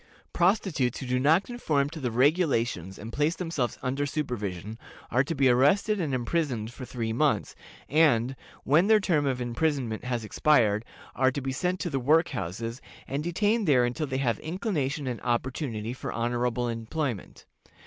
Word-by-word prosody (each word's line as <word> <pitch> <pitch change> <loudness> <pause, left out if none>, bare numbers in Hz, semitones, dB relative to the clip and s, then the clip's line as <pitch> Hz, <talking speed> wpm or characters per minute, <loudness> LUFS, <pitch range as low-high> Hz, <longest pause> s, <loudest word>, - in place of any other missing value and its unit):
Prostitutes 175 - +1
who - - -6
do 125 0 0
not 160 +8 +4
conform 155 - 0
to 165 - -7
the 130 -4 -1
regulations 120 - +1
and 115 +3 -8
place 150 +3 +1
themselves 160 - -2
under 135 +2 -1
supervision, 110 - -4 0.3
are 125 +3 +3
to 165 +4 -3
be 135 -1 +3
arrested 165 - +3
and 155 -4 -1
imprisoned 125 -3 -1
for 130 - -8
three 115 -3 -3
months, 150 +4 +1 0.3
and, 135 -5 +3 0.3
when 160 +8 +4
their 220 -1 +6
term 160 -8 +1
of 130 -2 0
imprisonment 125 -2 -1
has 120 -3 -2
expired, 110 -4 +3 0.3
are 130 - +3
to 140 - -3
be 135 0 -2
sent 180 +7 -1
to 175 - -2
the 135 - 0
"work 155 +6 +3
houses," 115 - -4 0.3
and 140 +3 -2
detained 205 +5 +1
there 130 -4 +5
until 135 +6 -2
they 130 -1 -2
have 125 -4 0
inclination 155 - -2
and 125 -3 -4
opportunity 120 -2 -2
for 130 - -6
honorable 120 +1 -1
employment. 115 - -4
130 Hz, 170 wpm, -27 LUFS, 120-155 Hz, 0.3 s, their